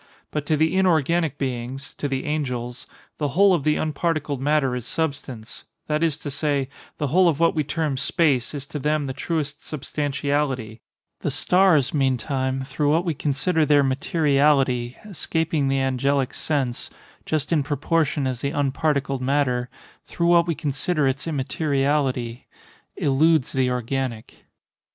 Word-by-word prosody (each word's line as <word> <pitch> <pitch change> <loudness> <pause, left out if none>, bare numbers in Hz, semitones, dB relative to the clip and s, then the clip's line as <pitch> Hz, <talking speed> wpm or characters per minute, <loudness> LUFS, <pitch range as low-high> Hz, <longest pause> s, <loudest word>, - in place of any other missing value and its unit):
But 150 -1 -3
to 155 - +2
the 160 +3 +2
inorganic 170 -4 +2
beings—to 130 +2 -4
the 135 -1 -2
angels—the 130 0 -4
whole 190 +7 +4
of 165 -6 +1
the 150 +1 +2
unparticled 155 -3 -1
matter 145 -3 +2
is 125 -2 -5
substance—that 145 0 -4
is 160 -3 +1
to 145 -2 -6
say, 140 -2 -1 0.3
the 145 - -1
whole 180 +4 +5
of 155 -3 -1
what 165 0 +4
we 155 - 0
term 150 -1 -2
"space" 145 -3 +1
is 140 -1 -5
to 150 - -6
them 150 +1 0
the 135 - -3
truest 145 0 -3
substantiality;—the 140 -5 -3
stars, 180 -7 +3
meantime, 130 -1 0
through 145 +2 -1
what 165 +4 +2
we 170 - 0
consider 150 +4 +1
their 145 -1 +4
materiality, 135 -3 +2
escaping 160 -6 -1
the 135 0 +1
angelic 135 0 0
sense, 135 -6 -1 0.4
just 155 -1 -1
in 155 - +3
proportion 145 +1 0
as 130 -2 -2
the 140 - 0
unparticled 140 -2 0
matter, 125 -2 0 0.4
through 170 - -2
what 170 0 +5
we 165 - 0
consider 150 +1 0
its 135 +4 -2
immateriality, 135 -4 -1 0.5
eludes 150 +1 +3
the 130 -1 +1
organic. 125 -1 -4
145 Hz, 140 wpm, -23 LUFS, 130-155 Hz, 0.5 s, whole